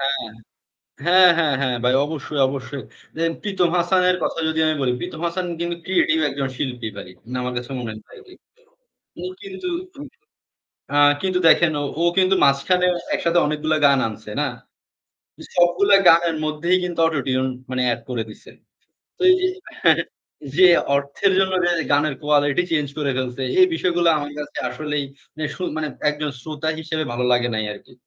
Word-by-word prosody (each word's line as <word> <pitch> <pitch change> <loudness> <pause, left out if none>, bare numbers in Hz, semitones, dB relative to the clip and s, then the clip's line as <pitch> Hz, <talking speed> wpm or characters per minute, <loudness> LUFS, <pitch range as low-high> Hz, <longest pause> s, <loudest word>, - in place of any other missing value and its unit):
হ্যাঁ। 140 0 0 0.9
হ্যাঁ, 180 +1 +7
হ্যাঁ, 155 -4 +2
হ্যাঁ 130 -3 0
ভাই। 125 - +3
অবশ্যই, 150 -1 -5
অবশ্যই। 135 0 -6 0.3
দেখেন 165 0 0
প্রীতম 195 -4 0
হাসানের 180 +1 +2
কথা - - -2
যদি 160 - -2
আমি 155 - +1
বলি, 125 -2 +1
প্রীতম 175 -3 -6
হাসান 180 +2 -3
কিন্তু 170 0 -2
ক্রিয়েটিভ 180 -4 +2
একজন 135 -1 -3
শিল্পী 125 -4 -4
ভাই। 100 - -8 0.2
না, 125 - -4
আমার 125 0 -3
কাছে 120 +2 -5
মনে 120 - -5
হয়নি 110 0 -9
ভাইটি। 400 -3 -16 0.9
ও - - -5 0.2
কিন্তু, 380 -2 -6 1.3
আ - - +3 0.2
কিন্তু 185 -1 0
দেখেন, 170 0 +5
ও - - -2 0.2
ও - - +2
কিন্তু 190 0 +4
মাঝখানে 140 +7 +2 0.3
একসাথে 170 +1 +1
অনেকগুলা 155 +1 0
গান 140 -1 +3
আনসে, 110 -1 -9
না? 150 - +1 1.1
সবগুলো 175 +3 +3 0.2
গানের 165 0 +4
মধ্যেই 160 +4 +1
কিন্তু 175 -2 -5
অটোটিউন, 130 -4 -1 0.2
মানে 130 0 -1
অ্যাড 120 0 -1
করে 120 -3 -2
দিসে। 105 - -14 0.7
তো - - -13
এই - - +6
যে, - - +2 0.4
হ্যাঁ - - +6
হ্যাঁ - - -3 0.5
যে 185 +1 +7 0.3
অর্থের 140 +8 0
জন্য 190 0 +2 0.2
এর 170 - -1
গানের 145 -1 +2
কোয়ালিটি 145 +2 +2
চেঞ্জ 150 -3 +1
করে 145 -2 0
ফেলসে, 130 0 -3 0.2
এই 370 - +8
বিষয়গুলা 175 - +1
আমার 145 0 -5
কাছে 150 - -7
আসলেই, 150 -2 -3 0.3
মানে 155 0 -3
শুন 185 - -4
মানে 155 -1 -2 0.2
একজন 150 0 -3
শ্রোতা 155 +1 -4
হিসেবে 155 0 -3
ভালো 125 +1 -1
লাগে 120 0 +1
নাই 110 -1 -1
আরকি। 105 - -16
155 Hz, 170 wpm, -21 LUFS, 135-175 Hz, 1.3 s, এই